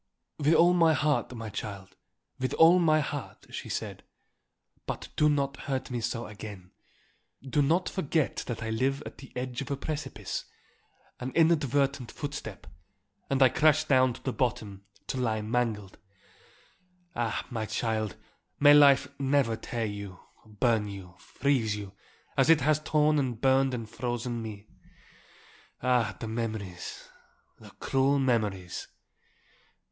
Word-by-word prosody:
"With 150 +2 +4
all 175 +1 +6
my 165 -2 +5
heart, 150 -1 +1
my 115 -1 -6
child, 100 -2 -7 0.4
with 130 0 -1
all 170 +3 +7
my 155 -3 +4
heart," 145 -2 -6
she - - -6
said. - - -4 0.9
"But - - -5
do 150 - +4
not 140 -1 0
hurt 130 -2 -4
me 120 -1 -2
so 115 +1 -2
again. 100 -3 -9 0.8
Do 145 +3 +2
not 165 +6 +2
forget 160 -4 -1
that 120 -2 -4
I 110 - -3
live 135 +5 0
at - - -9
the 135 - -12
edge 125 0 -3
of 140 - -6
a 140 - -1
precipice; 155 +1 -4 0.7
an 125 +1 -4
inadvertent 140 -5 +2
footstep, 145 -1 -6 0.6
and 135 0 +4
I 130 - +7
crash 155 +3 +4
down 130 -4 +3
to - - -13
the 130 - -2
bottom, 105 -6 -2 0.2
to - - -4
lie 110 -4 0
mangled. 110 -3 -2 1.2
Ah, 115 -2 -1
my 110 -2 -3
child, 110 -1 -1 0.4
may 145 0 +8
life 140 -3 +7
never 135 -4 +2
tear 115 +1 -3
you, 100 -3 -6 0.2
burn 110 0 0
you, 95 -3 -9
freeze 120 -6 0
you, 100 -2 -7 0.4
as 135 -1 +3
it 165 -3 +6
has 150 +3 +3
torn 150 0 +2
and 125 -5 -2
burned 135 0 +3
and 115 -2 -5
frozen 120 +1 -3
me. 105 -2 -8 1.2
Ah, 125 -4 +2
the 115 - -5
memories, 110 -5 -5 0.5
the - - -13
cruel 135 +1 +2
memories!" 105 -9 -1
125 Hz, 140 wpm, -29 LUFS, 110-140 Hz, 1.2 s, may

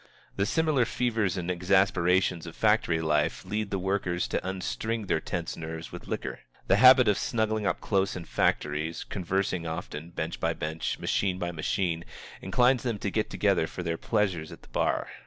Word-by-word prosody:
The 100 +1 0
similar 155 -6 +2
fevers 110 -5 0
and 90 0 -2
exasperations 90 -1 +2
of 85 - -9
factory 105 -6 +2
life 75 +2 0
lead 105 +2 -2
the 100 - -1
workers 95 -2 -1
to - - -1
unstring 100 +4 -3
their - - +1
tense 85 -2 -4
nerves 80 0 -6
with - - -9
liquor. - - -4 0.3
The - - +4
habit 130 -1 +8
of 105 - +3
snuggling 110 -2 0
up - - -1
close 95 -2 +1
in 90 -2 -6
factories, 75 +2 0
conversing 95 -2 -2
often, 80 -1 -5
bench 80 -1 -4
by - - +1
bench, 80 +1 -3
machine 95 -2 0
by 90 -1 -2
machine, 85 +1 -1 0.4
inclines 125 +1 +3
them 120 -4 -2
to 100 -1 -3
get 110 +1 0
together 100 -6 +2
for 90 - -6
their 85 -1 -2
pleasures 95 -8 0
at - - -12
the - - -18
bar. - - 0
95 Hz, 175 wpm, -28 LUFS, 85-105 Hz, 0.4 s, habit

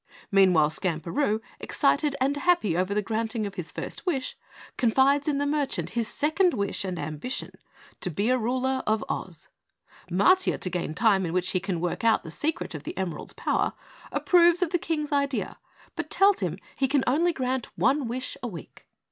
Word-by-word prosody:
Meanwhile, 180 -6 +5
Skamperoo, 190 - -1 0.2
excited 285 0 +1
and 270 +2 +1
happy 285 - +2
over 185 +2 0
the 210 +1 0
granting 220 +1 -2
of 200 - -5
his 175 -3 -6
first - - -6
wish, 275 -8 -2 0.4
confides 270 +4 +3
in 290 -2 +1
the 285 - 0
merchant 275 - -1
his 230 +1 -1
second 325 - +2
wish 200 -1 -2
and 185 -2 -3
ambition 155 - -4 0.5
to - - -1
be 200 +9 0
ruler 255 +2 0
of 215 0 +1
Oz. - - -5 0.6
Matiah, 360 - +3
to 185 - -2
gain 170 -3 -3
time 195 -1 +3
in 170 -2 -3
which 180 0 0
he 185 - +1
can 185 -3 -3
work 175 +6 -2
out 225 -1 +3
the 160 - -8
secret 300 - -2
of 155 - -6
the - - -7
emeralds' 185 -4 -3
power, - - 0 0.4
approves 345 0 +4
of 335 - -2
the 350 - +1
King's 310 -4 -2
idea, 280 -1 -1 0.4
but - - -4
tells 395 0 +4
him 175 -2 -2 0.2
he 270 - +1
can 275 0 +2
only 325 +8 +3
grant 260 -5 -2
one 275 -1 +2
wish 250 +2 -4
a 245 - -3
week. 175 -9 -10
240 Hz, 180 wpm, -26 LUFS, 185-285 Hz, 0.6 s, Meanwhile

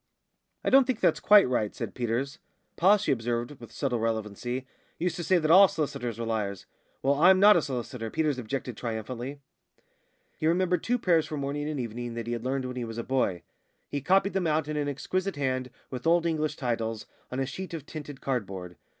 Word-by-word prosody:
"I - - 0
don't 270 0 +6
think 255 -4 0
that's - - +3
quite 205 -5 +7
right," 110 -5 -1
said - - -5
Peters. 125 +5 -2 0.4
"Pa," 195 +5 +5
she 200 -7 -1
observed, 120 +2 -2
with 115 -2 -11
subtle 125 0 -1
relevancy, 115 +3 -2 0.3
"used 175 +1 -1
to 175 - -3
say 185 +2 +3
that 155 -2 +1
all 195 +3 +9
s'listers 125 - -3
were 115 - -3
liars." 105 -4 -2 0.4
"Well, 135 +1 +4
I'm 180 +6 +6
not 210 +2 +8
a 170 - +4
solicitor," 125 -4 -4
Peters 150 -1 0
objected 125 +1 -4
triumphantly. 120 +5 -5 1.0
He 155 - +1
remembered 180 +1 +2
two 245 +1 +1
prayers 170 -8 +2
for 155 -1 -4
morning 145 +2 -2
and 150 -3 -3
evening 120 0 -4
that 115 -1 -4
he 120 - -2
had 115 -1 -4
learned 130 +1 -1
when 125 0 -5
he 125 - -2
was 115 -1 -6
a 115 - -2
boy. 120 -10 0 0.5
He 145 - -3
copied 190 +6 +3
them 190 -3 0
out 155 -1 +1
in 155 - -3
an 145 -1 0
exquisite 185 +7 -2
hand, 130 -2 -1 0.2
with 125 +2 -4
Old 170 0 +4
English 155 -2 0
titles, 115 -4 -2 0.3
on 125 - -3
a 135 - +1
sheet 185 +7 -6
of 150 -4 -7
tinted 145 -3 -8
cardboard. 95 -9 -3
135 Hz, 205 wpm, -28 LUFS, 120-160 Hz, 1.0 s, all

